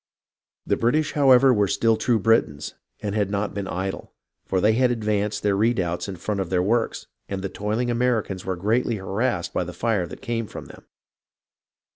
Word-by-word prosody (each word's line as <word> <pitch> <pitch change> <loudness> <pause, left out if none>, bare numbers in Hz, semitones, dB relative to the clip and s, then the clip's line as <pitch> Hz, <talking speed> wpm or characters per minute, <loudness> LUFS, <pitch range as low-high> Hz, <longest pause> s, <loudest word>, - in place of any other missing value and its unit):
The - - +1
British, 145 +6 +1
however, 135 -2 +5
were 105 -3 +2
still 115 +3 +2
true 115 +1 +1
Britons, 100 -9 +1 0.3
and 100 -1 -3
had 105 -2 0
not 100 0 -2
been 100 -1 -4
idle; 95 +1 -4 0.3
for 95 - +1
they 105 +4 +4
had 125 +2 +3
advanced 105 -3 -1
their 100 -1 +2
redoubts 95 -6 0
in 95 - -5
front 100 +4 -3
of 95 -3 -2
their 90 -1 +1
works, 115 +4 0 0.2
and 95 -1 -4
the 95 - -2
toiling 110 +6 -2
Americans 115 -6 0
were 95 - -2
greatly 110 +6 0
harassed 95 -2 -2
by - - 0
the 90 0 -7
fire 105 -6 0
that - - -11
came 115 -2 -2
from - - -9
them. - - -15
105 Hz, 185 wpm, -24 LUFS, 95-115 Hz, 0.3 s, however